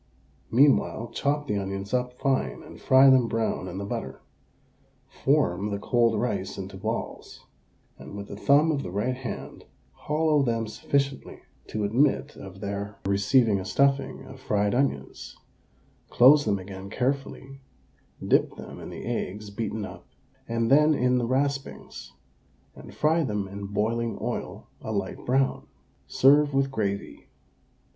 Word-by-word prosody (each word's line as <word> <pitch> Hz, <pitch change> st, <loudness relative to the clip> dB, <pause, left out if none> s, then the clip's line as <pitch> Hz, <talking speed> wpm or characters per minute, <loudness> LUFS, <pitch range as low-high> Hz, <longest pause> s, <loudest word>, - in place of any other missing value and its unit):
Meanwhile 120 Hz, -3 st, +3 dB
chop 145 Hz, +3 st, 0 dB
the 105 Hz, -7 st, -1 dB
onions 100 Hz, +1 st, -5 dB
up 125 Hz, 0 st, 0 dB
fine 135 Hz, +1 st, -1 dB
and -, -, -13 dB
fry 135 Hz, +1 st, +6 dB
them 130 Hz, -3 st, +4 dB
brown 115 Hz, -4 st, -1 dB
in 90 Hz, +1 st, -6 dB
the 100 Hz, -, -4 dB
butter. -, -, -5 dB, 0.8 s
Form 105 Hz, -, +1 dB
the 100 Hz, -, -2 dB
cold 115 Hz, +1 st, +2 dB
rice 100 Hz, -5 st, -2 dB
into 95 Hz, 0 st, -7 dB
balls, 110 Hz, +4 st, -5 dB, 0.5 s
and -, -, -10 dB
with 100 Hz, 0 st, -7 dB
the -, -, -8 dB
thumb 145 Hz, +9 st, +4 dB
of 145 Hz, -3 st, -1 dB
the 90 Hz, -, -6 dB
right 105 Hz, +7 st, -1 dB
hand 130 Hz, -1 st, -7 dB, 0.3 s
hollow 150 Hz, 0 st, +1 dB
them 115 Hz, -3 st, 0 dB
sufficiently 140 Hz, +5 st, -2 dB, 0.3 s
to 110 Hz, -, -3 dB
admit 125 Hz, +8 st, +1 dB
of 95 Hz, 0 st, -11 dB
their 100 Hz, 0 st, -4 dB
receiving 100 Hz, +2 st, +3 dB
a -, -, -5 dB
stuffing 140 Hz, +6 st, +1 dB
of 130 Hz, -, -12 dB
fried 105 Hz, -4 st, 0 dB
onions, 120 Hz, -, -2 dB, 0.7 s
close 145 Hz, +4 st, +6 dB
them 100 Hz, -2 st, +1 dB
again 95 Hz, 0 st, -8 dB
carefully, 135 Hz, +2 st, -3 dB, 0.7 s
dip -, -, +2 dB
them -, -, -10 dB
in -, -, -8 dB
the -, -, -8 dB
eggs 105 Hz, +2 st, -4 dB
beaten 110 Hz, 0 st, -3 dB
up -, -, -11 dB, 0.4 s
and 115 Hz, +1 st, 0 dB
then 150 Hz, +2 st, +5 dB
in 125 Hz, -1 st, +2 dB
the 120 Hz, -, -1 dB
raspings, 135 Hz, -, -3 dB, 0.6 s
and -, -, -12 dB
fry 160 Hz, +2 st, +2 dB
them 105 Hz, -6 st, -2 dB
in 100 Hz, +1 st, -7 dB
boiling 115 Hz, +3 st, -1 dB
oil -, -, -5 dB
a -, -, -5 dB
light -, -, -3 dB
brown. 135 Hz, +2 st, +1 dB, 0.4 s
Serve 145 Hz, +1 st, +4 dB
with 135 Hz, 0 st, +1 dB
gravy. 100 Hz, -5 st, -4 dB
115 Hz, 145 wpm, -26 LUFS, 100-135 Hz, 0.8 s, fry